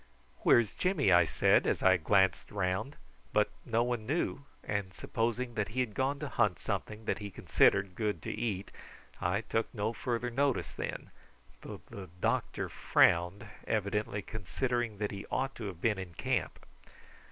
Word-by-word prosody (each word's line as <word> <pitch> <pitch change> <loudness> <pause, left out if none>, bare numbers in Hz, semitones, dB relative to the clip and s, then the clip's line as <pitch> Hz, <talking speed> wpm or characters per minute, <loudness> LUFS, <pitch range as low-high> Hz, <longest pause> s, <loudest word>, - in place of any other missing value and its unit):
"Where's 115 -4 +4
Jimmy?" 175 - +2
I 90 -1 +7
said - - +3
as - - 0
I 95 0 +6
glanced 95 +2 +2
round; 95 +7 -1 0.4
but - - +3 0.2
no 115 +1 +2
one 120 -3 -2
knew, 155 +2 0 0.2
and 100 -3 -3
supposing 120 +3 -2
that 105 -3 -1
he 115 +5 -4
had 125 -4 0
gone 135 +5 0
to - - -2
hunt 105 -7 +1
something 110 +1 -4
that - - -1
he 105 -1 -5
considered 95 0 +3
good 105 -3 -1
to - - -3
eat 100 -4 -3 0.5
I 90 +4 +1
took 115 0 -1
no 105 +2 -1
further 120 +1 -2
notice 135 +1 +1
then, - - -5 0.5
though - - -8
the 95 -3 -8
doctor 115 -1 0
frowned, 90 +5 +3 0.2
evidently 105 -1 -1
considering 115 +3 -2
that 105 0 -2
he 100 0 -7
ought 135 +1 -1
to 110 - -5
have 90 -4 -6
been 105 -4 +1
in 90 -3 -7
camp. - - -2
105 Hz, 165 wpm, -32 LUFS, 95-120 Hz, 0.5 s, I